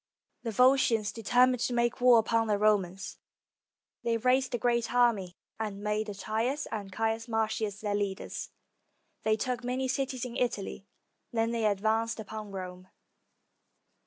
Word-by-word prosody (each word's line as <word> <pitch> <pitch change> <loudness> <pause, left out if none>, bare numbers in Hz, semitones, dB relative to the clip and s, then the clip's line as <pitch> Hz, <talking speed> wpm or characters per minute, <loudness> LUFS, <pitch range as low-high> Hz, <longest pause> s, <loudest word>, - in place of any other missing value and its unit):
[The 235 - -3
Volscians 235 -2 +3
determined 250 +3 +3
to 245 - -1
make 240 +1 +1
war 245 -1 +7
upon 225 0 +2
the 210 -1 +2
Romans. 195 -3 0 0.8
They 230 -1 +1
raised 255 +2 +2
a - - 0
great 235 -1 +1
army 225 -8 +2 0.2
and 205 -2 -4
made 210 +1 -1
Attius 225 +8 -2
and 205 -3 -5
Caius 225 +3 -1
Mar 225 -1 +1
cius 215 -1 -3
their 205 -1 -1
leaders. 200 -2 -3 0.7
They 220 0 +2
took 250 +3 -2
many 255 +2 -1
cities 265 -1 -2
in 240 -1 -7
Italy, 200 -5 -2 0.4
then 225 0 0
they 230 -2 0
advanced 220 +3 0
upon 215 0 -7
Rome. 185 -1 -7
225 Hz, 145 wpm, -30 LUFS, 210-245 Hz, 0.8 s, war